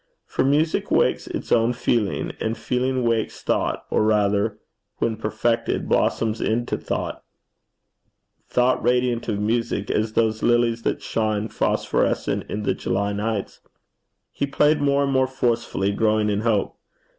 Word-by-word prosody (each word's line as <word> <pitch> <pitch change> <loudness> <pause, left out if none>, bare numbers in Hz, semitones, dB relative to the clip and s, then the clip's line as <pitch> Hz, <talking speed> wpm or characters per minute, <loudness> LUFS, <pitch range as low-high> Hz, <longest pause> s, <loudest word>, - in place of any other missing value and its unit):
For - - -1
music 150 +4 +1
wakes - - +2
its - - -6
own 115 +1 +3
feeling, 115 -4 0
and 110 +1 -2
feeling 130 0 -1
wakes 115 -2 -1
thought, - - -1
or - - +2
rather, 105 0 +2 0.4
when 115 -1 0
perfected, 110 +2 -1
blossoms 110 -1 +1
into 120 +2 0
thought, - - -4 1.3
thought 125 +1 +2
radiant 125 -1 +1
of 105 -2 -1
music 110 -1 -1
as 110 0 0
those 110 -1 +1
lilies 120 -1 +2
that - - -2
shine 110 -1 -1
phosphorescent - - 0
in 105 - -3
the - - +1
July 100 +2 -1
nights. 105 0 -3 0.7
He 140 - -2
played 150 +2 +2
more 140 0 +2
and 140 - 0
more 130 -1 +3
forcefully, 120 -6 0
growing 105 0 +1
in 100 - 0
hope. 110 -3 0
115 Hz, 140 wpm, -23 LUFS, 105-125 Hz, 1.3 s, own